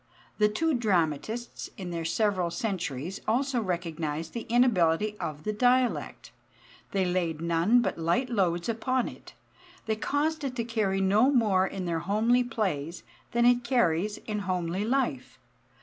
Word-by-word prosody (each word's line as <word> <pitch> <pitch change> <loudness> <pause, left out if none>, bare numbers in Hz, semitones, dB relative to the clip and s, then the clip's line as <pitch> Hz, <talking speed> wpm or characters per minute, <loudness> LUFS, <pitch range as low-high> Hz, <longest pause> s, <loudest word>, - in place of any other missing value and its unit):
The 210 0 +5
two 320 +9 0
dramatists 215 - -1
in 185 -4 -6
their 165 -1 -3
several 185 0 +1
centuries 180 - -3
also 250 +2 +1
recognized 165 -4 -3
the 235 - -5
inability 210 -5 +3
of 150 0 -5
the 215 - -2
dialect. 250 +3 +1 0.6
They 195 -2 0
laid 175 -3 -1
none 170 +9 +3
but - - -2
light 170 +11 +1
loads 180 -7 0
upon 240 +2 0
it. - - -11 0.5
They 220 - 0
caused 300 +7 -1
it 265 -2 -3
to 235 - -1
carry 215 -4 0
no 205 +7 +4
more 210 -8 +3
in 190 -2 -5
their 170 -1 -1
homely 220 +8 +2
plays 180 -9 -3 0.3
than 235 0 +2
it 245 0 +4
carries 210 -5 +1
in 215 -1 -4
homely 185 -1 -2
life. 260 +4 -1
210 Hz, 150 wpm, -28 LUFS, 170-240 Hz, 0.6 s, The